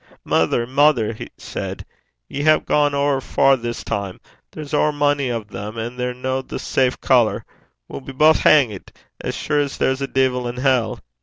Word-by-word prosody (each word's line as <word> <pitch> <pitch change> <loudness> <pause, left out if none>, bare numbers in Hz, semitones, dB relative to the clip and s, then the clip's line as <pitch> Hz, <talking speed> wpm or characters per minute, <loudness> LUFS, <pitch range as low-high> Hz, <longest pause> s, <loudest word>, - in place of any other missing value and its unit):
'Mither, 80 +9 +1
mither,' 130 -4 +2
he 110 - -8
said, - - -6 0.4
'ye 140 - -5
hae 155 +1 +4
gane 145 -1 +1
ower 140 -1 +1
far 135 +1 +3
this 120 -1 -5
time. 100 -2 -4 0.3
There's 150 -1 -9
ower 150 0 +3
mony 145 -2 +1
o' 115 -2 -2
them, 105 +1 -8
and 120 +2 -5
they're 125 0 -1
no 130 +1 -2
the - - -7
safe 130 -1 0
colour. 120 -4 +2 0.4
We'll - - -8
be 135 - -9
baith 155 +4 +4
hangt, 120 -11 +3 0.3
as - - -3
sure's 145 -2 -1
there's 130 +1 0
a 135 - -1
deevil 130 -2 0
in 120 +1 -5
hell.' 125 -4 +1
130 Hz, 175 wpm, -20 LUFS, 120-145 Hz, 0.4 s, hae